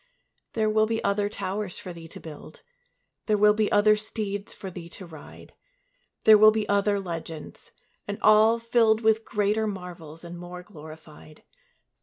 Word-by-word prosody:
There 220 -1 0
will 215 0 +2
be 225 0 -2
other 200 +1 0
towers 205 -2 -4
for 180 - -8
thee 165 -1 -11
to - - -11
build; 155 -1 -12 0.6
There 215 -1 +2
will 210 0 +5
be 215 -1 0
other 210 +1 +5
steeds 210 -2 -4
for 190 - -8
thee 170 -1 -9
to 185 - -8
ride; 160 -4 -13 0.7
There 215 -1 +7
will 215 0 +9
be 215 -1 -1
other 200 0 +1
legends, 165 -4 -8 0.4
and 205 0 -4
all 215 +2 +6
filled 230 -1 +2
With 220 0 +2
greater 210 +1 0
marvels 175 -5 -8
and 170 0 -9
more 180 0 -9
glorified. 155 -3 -14
205 Hz, 160 wpm, -26 LUFS, 175-215 Hz, 0.7 s, will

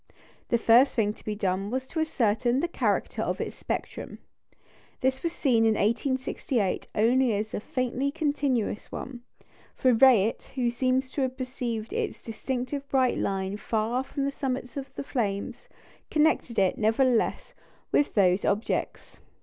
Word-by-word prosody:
The 235 - +3
first 235 +4 +5
thing 210 -3 +1
to - - -19
be 215 - -3
done 195 -1 -1
was 260 +3 -2
to 320 - -5
ascertain 240 -4 +1
the 345 - 0
character 340 - -1
of - - -2
its - - -4
spectrum. - - -5 0.8
This 260 0 +1
was 335 - -1
seen 250 -8 +2
in 220 -1 +4
1868 240 -2 0
only 235 +2 +3
as 215 +2 -3
a - - -1
faintly 255 +4 -1
continuous 285 -8 -1
one; 250 -2 -6 0.5
for 255 -1 +3
Rayet, 230 -3 +4
who 245 -3 +1
seems 260 +2 0
to 285 - -2
have 260 0 -1
perceived 245 -4 -4
its - - -2
distinctive 255 +4 -4
bright 260 -2 +2
line 195 0 -1
far 225 +3 -1
above 265 - -7
the 280 0 0
summits 260 -2 -3
of 275 -1 -6
the - - -4
flames, 230 -2 -3 0.4
connected 305 -6 +2
it, 190 -2 +2
nevertheless, 225 +2 +1 0.4
with 290 - +2
those 190 -2 +4
objects. 210 +4 -2
245 Hz, 150 wpm, -27 LUFS, 220-265 Hz, 0.8 s, first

